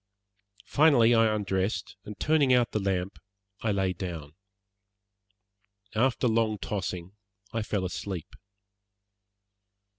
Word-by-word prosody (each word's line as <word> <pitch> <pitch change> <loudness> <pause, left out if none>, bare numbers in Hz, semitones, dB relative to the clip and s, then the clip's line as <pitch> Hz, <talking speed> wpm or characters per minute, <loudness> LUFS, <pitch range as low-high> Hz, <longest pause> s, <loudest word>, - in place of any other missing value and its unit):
Finally 140 -6 +5
I 115 -1 +5
undressed, 100 -1 -1
and 105 -2 -9
turning 150 -3 +3
out 125 -2 +3
the 110 - 0
lamp, 95 -1 -2 0.4
I 110 - 0
lay 95 -2 0
down. 85 -5 -6 1.6
After 125 +3 +2
long 110 -1 +1
tossing 95 -4 -4 0.4
I 115 - -1
fell 105 -3 -2
asleep. 90 -2 -5
105 Hz, 100 wpm, -28 LUFS, 95-115 Hz, 1.6 s, Finally